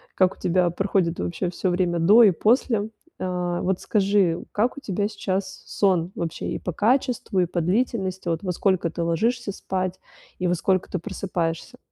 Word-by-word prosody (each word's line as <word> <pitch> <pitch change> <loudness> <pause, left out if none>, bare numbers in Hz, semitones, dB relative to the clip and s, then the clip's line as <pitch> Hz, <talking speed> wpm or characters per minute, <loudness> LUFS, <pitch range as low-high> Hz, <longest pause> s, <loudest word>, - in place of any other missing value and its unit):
Как 185 -1 +3
у - - -27
тебя 180 0 +2
проходит 185 -2 0
вообще 175 +1 -2
всё 180 +1 -2
время 175 -1 0
до 210 +8 +7
и 200 - +7
после. 220 - +1 0.3
А, 180 -1 -2
вот 185 0 0
скажи, 195 -5 +2
как 235 +6 0
у 285 - -7
тебя 205 -1 -1
сейчас 195 -2 -4
сон 185 -3 +1
вообще 165 -2 -4
и - - -3
по 180 - -4
качеству, 245 -2 +1
и 180 - +4
по 175 0 -2
длительности, 190 -1 -1
вот 165 +3 -2
во 180 - -1
сколько 185 -1 +1
ты 170 +1 -3
ложишься 215 +7 0
спать 185 -1 -3 0.4
и 180 - 0
во 175 - +2
сколько 185 +2 0
ты 185 - -1
просыпаешься? 170 +5 -3
185 Hz, 180 wpm, -24 LUFS, 175-205 Hz, 0.4 s, до